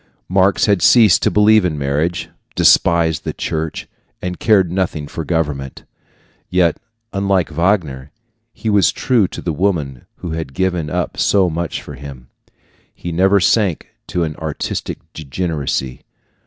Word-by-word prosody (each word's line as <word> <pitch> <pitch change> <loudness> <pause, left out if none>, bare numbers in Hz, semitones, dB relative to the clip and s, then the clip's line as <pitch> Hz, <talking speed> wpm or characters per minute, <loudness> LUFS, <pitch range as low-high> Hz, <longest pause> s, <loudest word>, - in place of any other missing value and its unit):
Marx 95 +1 +3
had 100 -4 +2
ceased 110 -8 +6
to - - +3
believe 105 0 +5
in 85 -4 -1
marriage, 75 +5 -1 0.3
despised 85 -2 +3
the - - -3
church, 80 0 -4 0.3
and 90 -1 -5
cared 95 -6 +3
nothing 85 -5 -2
for 80 - -5
government. 75 -5 -3 0.7
Yet, 90 -3 +2 0.4
unlike 100 -4 0
Wagner, 80 -6 0 0.4
he 115 - -8
was 105 -2 +4
true 120 -7 +1
to - - -8
the 85 - -1
woman 75 -7 -2
who 85 - -7
had 80 -4 -5
given 90 -5 -1
up - - -3
so 95 -4 +2
much 85 0 -3
for - - -9
him. 70 -3 -10 0.6
He 85 - -7
never 95 +4 +3
sank 95 -2 +1 0.2
to 90 - -1
an 75 -2 -3
artistic 80 -2 -4 0.2
degeneracy. 75 -4 -3
85 Hz, 140 wpm, -18 LUFS, 75-95 Hz, 0.7 s, ceased